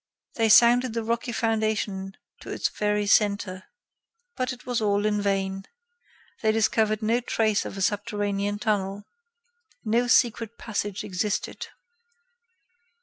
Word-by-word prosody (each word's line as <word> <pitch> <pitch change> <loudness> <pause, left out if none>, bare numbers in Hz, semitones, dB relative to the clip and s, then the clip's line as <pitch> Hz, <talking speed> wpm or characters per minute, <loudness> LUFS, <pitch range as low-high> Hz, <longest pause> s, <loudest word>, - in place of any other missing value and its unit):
They 225 -1 +1
sounded 240 +2 +6
the 230 - -1
rocky 235 +2 -2
foundation 215 -4 -1 0.2
to - - -11
its - - -1
very 210 0 -1
centre. 200 -2 +1 0.7
But 255 -1 -1
it 250 -1 -10
was 245 -2 -1
all 205 -1 +1
in 210 -1 +1
vain. 195 -1 -1 0.8
They 220 - +3
discovered 220 0 +1
no 230 +3 +2
trace 220 -3 0
of - - -7
a 195 - -1
subterranean 205 -1 -1
tunnel. 205 -2 -1 0.8
No 235 +3 +2
secret 230 -1 +2
passage 205 -3 -4
existed. 200 +2 -3
215 Hz, 125 wpm, -25 LUFS, 200-230 Hz, 0.8 s, sounded